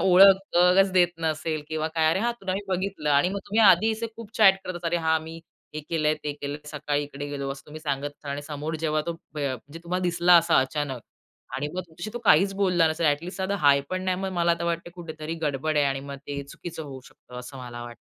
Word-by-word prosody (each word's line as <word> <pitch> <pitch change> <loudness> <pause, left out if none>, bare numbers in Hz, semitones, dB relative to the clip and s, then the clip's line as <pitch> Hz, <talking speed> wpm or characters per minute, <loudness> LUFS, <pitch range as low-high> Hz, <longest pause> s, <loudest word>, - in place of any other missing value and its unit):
ओळखच 190 0 +5
देत 180 -2 +5
नसेल 155 -1 -2
किंवा 155 0 -2
काय, 160 -1 +3
अरे 165 - +1
हां 240 +2 +1
तुला 190 -1 -2
मी 195 - -2
बघितलं 185 -5 -2
आणि 145 +4 +4
मग 200 +2 -3
तुम्ही 215 +3 +1
आधी 215 +6 +5 0.2
खूप 225 -2 -10
चॅट 195 -3 +6
करतात. 175 -1 -6
अरे 175 - +1
हां 160 -1 +1
मी 165 +1 -9 0.3
हे 155 - -3
केलंय, 155 -2 +2
ते 150 - -1
केलंय, 145 0 -6
सकाळी 145 -1 -2
इकडे 145 0 -7
गेलो, 140 -1 -4
असं 135 - -13
तुम्ही 155 +1 -9
सांगत 140 -2 -2
असाल 145 -1 -8
आणि 145 +1 -4
समोर 150 +2 -5
जेव्हा 155 -1 +1
तो 170 - -1 0.2
प्य 150 -2 -2
अ, 130 - -2
म्हणजे 145 +7 -11
तुम्हाला 180 +2 -2
दिसला 175 0 +4
असा 170 0 +4
अचानक 135 -1 -3 0.6
आणि 145 +2 -2
मग 185 - -1
तुमच्याशी 170 +5 -8
तो 240 - -2
काहीच 195 +5 +5
बोलला 180 -4 +3
नसेल, 160 +1 0
ॲट 145 +1 +2
लिस्ट 180 - -7
साधा 190 +1 -1
हाय 140 -4 +5
पण 185 0 -2
नाही, 185 -1 +1
मग 190 0 -3
मला 170 -1 +2
आता 170 0 0
वाटतं 170 0 -2
कुठेतरी 160 -2 -6
गडबड 150 +1 -1
आहे 145 - +4
आणि 135 0 -1
मग 140 0 -7
ते 140 0 -4
चुकीचं 160 +4 -8
होऊ 135 -3 -8
शकतं, 125 0 -13
असं 125 +2 -9
मला 120 -1 -7
वाटतं. 120 0 -9
160 Hz, 235 wpm, -26 LUFS, 145-180 Hz, 0.6 s, चॅट